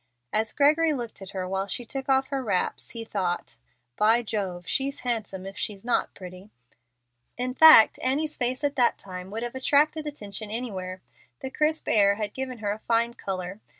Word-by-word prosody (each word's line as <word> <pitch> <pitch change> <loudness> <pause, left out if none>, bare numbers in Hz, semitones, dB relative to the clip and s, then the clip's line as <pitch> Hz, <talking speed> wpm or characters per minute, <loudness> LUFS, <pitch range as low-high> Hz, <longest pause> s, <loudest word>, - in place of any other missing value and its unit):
As 220 +1 0
Gregory 305 +2 +3
looked 240 -6 -6
at 190 - -8
her 185 -2 -4
while 195 +1 -2
she 240 +5 -2
took 270 +3 -6
off 265 0 +3
her 275 -1 -2
wraps, 200 -6 -1
he 230 -1 -7
thought, 180 - -3 0.4
"By 225 +3 +4
Jove! 190 -5 -4
she's 275 +1 -1
handsome 215 -6 -3
if 195 +1 -8
she 210 - -3
is 195 - -18
not 245 - 0
pretty." 185 +2 -11 0.9
In 250 +1 -2
fact 310 -6 +8
Annie's 300 +4 -1
face 255 +3 -2
at 285 -1 0
that 245 -2 +3
time 185 -1 -8
would 220 +3 -4
have 240 - -4
attracted 300 +4 +2
attention 215 -7 -5
anywhere. 190 -5 -5 0.4
The 265 - -5
crisp 310 +2 0
air 200 -2 +4
had 210 -1 -4
given 260 -1 -5
her 205 - +1
a 210 - -4
fine 235 +1 +1
color. 190 -2 -5
225 Hz, 185 wpm, -26 LUFS, 195-265 Hz, 0.9 s, fact